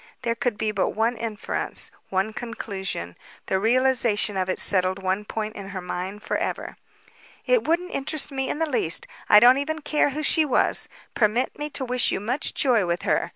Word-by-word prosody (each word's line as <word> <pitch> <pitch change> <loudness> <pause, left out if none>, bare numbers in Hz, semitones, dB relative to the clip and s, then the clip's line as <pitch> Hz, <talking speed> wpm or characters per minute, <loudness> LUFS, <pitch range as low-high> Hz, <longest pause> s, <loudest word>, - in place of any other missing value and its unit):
There 230 - +1
could 235 -1 -2
be 215 0 -1
but 195 -3 -1
one 225 +3 +1
inference, 220 -2 -3 0.2
one 195 +3 -1
conclusion. 195 - -5 0.3
The 190 - 0
realization 235 -2 +2
of 185 -1 -1
it 185 - 0
settled 185 -1 +2
one 190 +2 -2
point 215 0 -4
in 200 -1 -8
her 190 -1 -5
mind 185 +3 -5
forever. - - -3 0.7
"It - - +2
wouldn't 350 +3 0
interest 285 +2 +3
me 265 -1 -2
in - - -2
the 325 - +1
least. 245 - +1 0.2
I 210 - +9
don't 250 +4 +6
even 310 +2 -3
care 300 0 +2
who 300 +3 -4
she 315 - +4
was. 275 -5 +2 0.2
Permit 230 +3 +1
me 295 0 -3
to 270 -2 -4
wish 250 0 +1
you - - -1
much 250 +9 -2
joy 245 -6 +3
with 170 +1 -2
her. - - 0
225 Hz, 190 wpm, -24 LUFS, 195-265 Hz, 0.7 s, I